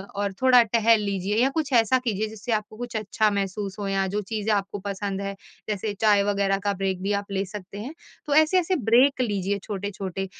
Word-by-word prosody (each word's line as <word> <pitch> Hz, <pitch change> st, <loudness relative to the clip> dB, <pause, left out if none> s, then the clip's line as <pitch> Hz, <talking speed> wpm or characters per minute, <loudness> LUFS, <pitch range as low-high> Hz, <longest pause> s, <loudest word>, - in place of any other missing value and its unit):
और 200 Hz, -1 st, -2 dB
थोड़ा 255 Hz, -1 st, +7 dB
टहल 225 Hz, 0 st, +3 dB
लीजिए 200 Hz, 0 st, -1 dB
या 270 Hz, -, +3 dB
कुछ 290 Hz, -1 st, -2 dB
ऐसा 235 Hz, +2 st, +4 dB
कीजिए 220 Hz, -4 st, -1 dB
जिससे 220 Hz, +2 st, -6 dB
आपको 215 Hz, 0 st, -3 dB
कुछ 245 Hz, 0 st, -6 dB
अच्छा 215 Hz, +1 st, +1 dB
महसूस 195 Hz, 0 st, -3 dB
हो 200 Hz, -, -3 dB
या 195 Hz, 0 st, 0 dB
जो 205 Hz, +2 st, -2 dB
चीजें 215 Hz, +1 st, -2 dB
आपको 200 Hz, 0 st, -2 dB
पसंद 200 Hz, 0 st, -4 dB
है, 200 Hz, 0 st, -4 dB, 0.3 s
जैसे 210 Hz, 0 st, -2 dB
चाय 205 Hz, -2 st, +5 dB
वगैरह 200 Hz, -1 st, +1 dB
का 200 Hz, -, +2 dB
ब्रेक 190 Hz, -1 st, -2 dB
भी 200 Hz, +1 st, 0 dB
आप 200 Hz, -, -15 dB
ले 195 Hz, 0 st, -1 dB
सकते 200 Hz, 0 st, -9 dB
हैं। 250 Hz, +8 st, -6 dB, 0.3 s
तो 290 Hz, -2 st, 0 dB
ऐसे-ऐसे 350 Hz, +4 st, +4 dB, 0.2 s
ब्रेक 260 Hz, +3 st, +5 dB
लीजिए 205 Hz, -3 st, -1 dB
छोटे-छोटे 195 Hz, -2 st, -4 dB
205 Hz, 200 wpm, -25 LUFS, 195-230 Hz, 0.3 s, थोड़ा